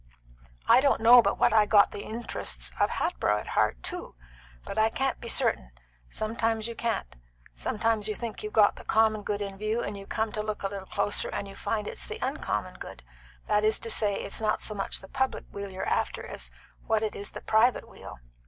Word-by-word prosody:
I 255 - +7
don't 280 0 +3
know 240 +2 +9
but 200 -3 0
what - - +3
I 215 -1 +5
got 205 -2 +6
the - - -7
interests 205 - -4
of - - +3
Hatboro' 105 +12 0
at 105 - -6
heart - - +1
too, - - -6 0.5
but - - -3
I 220 0 +4
can't 270 +3 -1
be 235 - -6
certain; 65 - +1 0.4
sometimes 225 0 -1
you 235 - -5
can't; 230 - -3 0.4
sometimes 215 - 0
you 215 - -2
think 235 -2 -5
you've 215 - -5
got 210 -2 +4
the - - -10
common 220 -1 +3
good 205 0 -2
in 195 -1 -7
view, 215 +3 -1
and 205 - -4
you 195 0 -9
come 220 -1 -1
to 215 - -2
look 215 -1 -4
a 195 - 0
little 195 -1 -7
closer 200 0 +1
and 200 - -4
you 195 - -10
find 210 -2 -2
it's - - -4
the - - -5
uncommon - - -3
good; - - -9 0.4
that 210 0 +2
is 215 0 +3
to 230 - -3
say, 205 -2 +2
it's 200 - -3
not 215 -1 +1
so 215 - -2
much 195 -1 0
the 190 - -11
public 265 +2 -1
weal 200 0 -5
you're 190 0 -5
after - - -1
as - - -6 0.4
what 220 -1 +2
it 215 - -2
is 200 - -6
the - - -7
private 225 +3 +3
weal. - - -11
215 Hz, 220 wpm, -28 LUFS, 200-225 Hz, 0.5 s, know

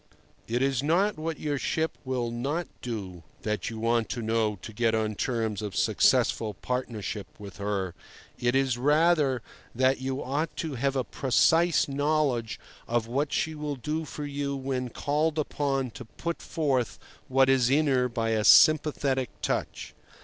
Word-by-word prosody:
It 120 +3 0
is 135 -2 +1
not 170 +6 +1
what 160 -1 -3
your 145 -2 -2
ship 160 +4 -1
will 125 -3 -2
not 140 +9 -2
do 100 -8 -5 0.2
that 105 -1 -2
you 115 - -7
want 115 0 +1
to 120 - -3
know 110 -1 +1
to 110 - -8
get 115 +1 +1
on 110 -1 0
terms 110 -2 -2
of 105 -3 -5
successful 110 -3 +2
partnership 110 -3 -4
with 100 -3 -10
her; 100 -3 -2 0.5
it 120 +1 +1
is, 135 -3 +1
rather, 145 -3 +3 0.3
that 130 +2 +2
you 130 +1 -2
ought 145 +5 -2
to 160 -3 -3
have 135 +2 -1
a 130 - +1
precise 165 +7 +3
knowledge 140 -5 0 0.3
of 120 -1 0
what 140 +5 -1
she 160 - 0
will 150 -1 -4
do 150 +5 -3
for 150 -1 -6
you 140 -1 -3
when 130 -2 -3
called 150 +5 0
upon 140 -4 -1
to 125 - -9
put 170 +9 -5
forth 135 -7 -1 0.3
what 135 0 +4
is 130 -2 +4
in 150 +3 +3
her 130 -3 +2
by 115 -1 -1
a 110 -1 +1
sympathetic 140 -2 +5
touch. - - -2
130 Hz, 165 wpm, -27 LUFS, 115-145 Hz, 0.5 s, sympathetic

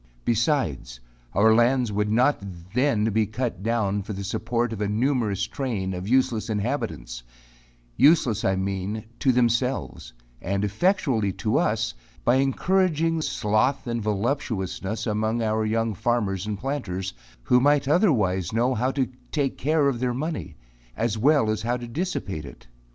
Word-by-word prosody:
Besides, 110 - 0 0.3
our 110 +3 +5
lands 120 0 +3
would 105 +1 0
not 125 +4 +3
be 100 - -7 0.3
then 110 -4 +2
cut 115 -2 -3
down 105 -2 0
for 105 +2 -6
the 100 0 -5
support 115 +3 -1
of 105 - -6
a 105 - +1
numerous 110 -2 0
train 110 -9 -3
of 90 +1 -5
useless 120 -3 +1
inhabitants 105 - -3 0.8
useless, 135 -9 +4
I 95 - +2
mean, 95 +3 -3
to 135 - +3
themselves, 120 - 0 0.3
and 100 +3 -1
effectually 115 - +1
to 110 +3 0
us, 115 +1 0 0.3
by 120 +2 +4
encouraging 165 +3 +1
sloth 130 +3 0
and 115 -1 -2
voluptuousness 105 -2 -2
among 110 +1 0
our 110 0 +1
young 115 +1 0
farmers 105 -3 -1
and 105 -1 -2
planters, 95 -7 -3 0.3
who 125 - +4
might 145 +1 +3
otherwise 110 - +2
know 120 +3 +1
how 125 +2 0
to 135 -2 0 0.2
take 140 -3 0
care 150 +1 +2
of 130 -4 0
their 125 -1 -1
money, 145 - -4 0.4
as 115 -1 0
well 135 +2 +3
as 110 - -2
how 120 +2 0
to 120 -1 -7
dissipate 115 - -3
it. - - -12
115 Hz, 150 wpm, -25 LUFS, 105-130 Hz, 0.8 s, our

